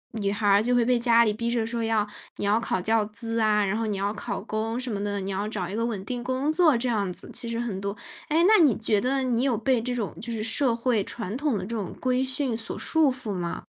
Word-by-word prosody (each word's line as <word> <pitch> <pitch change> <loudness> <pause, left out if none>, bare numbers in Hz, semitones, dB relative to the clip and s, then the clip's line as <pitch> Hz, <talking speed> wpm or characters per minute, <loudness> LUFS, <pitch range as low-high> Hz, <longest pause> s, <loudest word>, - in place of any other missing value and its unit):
女 200 -2 0
孩 205 +1 -1
儿 200 0 +6
就 245 +3 +2
会 240 -1 +3
被 250 0 +3
家 235 -1 +5
里 215 - +1
逼 235 +2 -2
着 235 -2 0
说 230 0 -2
要 220 -2 +1 0.3
你 - - -2
要 210 +2 +3
考 225 - -1
教 220 +4 +2
资 230 +2 -4
啊， 210 -1 +3
然 195 +1 0
后 225 0 -1
你 205 -2 -2
要 200 +2 -1
考 205 -1 -4
公 220 +3 -3
什 255 -1 -4
么 200 0 -3
的， 205 -1 -2
你 195 0 -4
要 200 +2 -2
找 185 -5 -3
一 195 - -5
个 230 +1 0
稳 205 -5 -4
定 245 +2 -3
工 260 +5 0
作 315 -6 +4
这 245 +2 -1
样 205 -6 0
子， - - -8
其 235 - -4
实 230 - -2
很 215 -5 -3
多。 200 +1 -4 0.3
哎， 320 +2 +3
那 420 -4 +6
你 275 -7 +4
觉 215 -2 +1
得 265 +3 +1
你 245 -2 +1
有 260 -5 +2
被 240 +1 +1
这 250 +1 -2
种 230 -4 -3
就 235 +2 -5
是 220 -2 -3
社 235 +2 +1
会 230 -3 +1
传 225 -2 -5
统 280 -4 0
的 - - -3
这 230 +4 -4
种 205 -5 -4
规 255 0 +1
训 260 -2 -1
所 225 - -5
束 315 -4 +2
缚 240 -5 -4
吗？ 175 -2 -4
230 Hz, 295 characters per minute, -26 LUFS, 205-245 Hz, 0.3 s, 儿